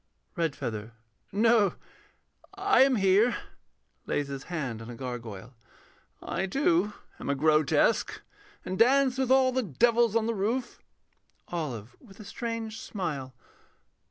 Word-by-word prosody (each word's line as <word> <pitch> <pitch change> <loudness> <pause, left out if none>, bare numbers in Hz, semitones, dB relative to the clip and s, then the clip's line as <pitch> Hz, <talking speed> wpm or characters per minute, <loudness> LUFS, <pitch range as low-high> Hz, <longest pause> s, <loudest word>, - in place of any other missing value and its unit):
REDFEATHER. 115 - -3 0.4
No, 215 -1 +3 0.8
I 390 -6 +3
am 265 -1 +5
here. 205 +4 +3 0.7
[Lays 145 -1 -1
his 135 -1 -6
hand 140 -10 -4
on 115 - -9
a 120 - -7
gargoyle.] 120 -3 -7 0.7
I, 190 - -2
too, 200 - +2 0.3
am - - -5
a 140 - +2
grotesque, 155 +6 +2 0.5
And 185 +2 -4
dance 265 +2 +4
with 260 -2 0
all 260 0 +5
the 260 +1 +1
devils 230 - +2
on 225 -1 +2
the 230 - 0
roof. 235 +5 -2 0.7
OLIVE 130 -10 -4
[_with 200 -5 -16
a 215 - -10
strange 230 -1 -5
smile. 145 - -5
195 Hz, 130 wpm, -28 LUFS, 140-235 Hz, 0.8 s, am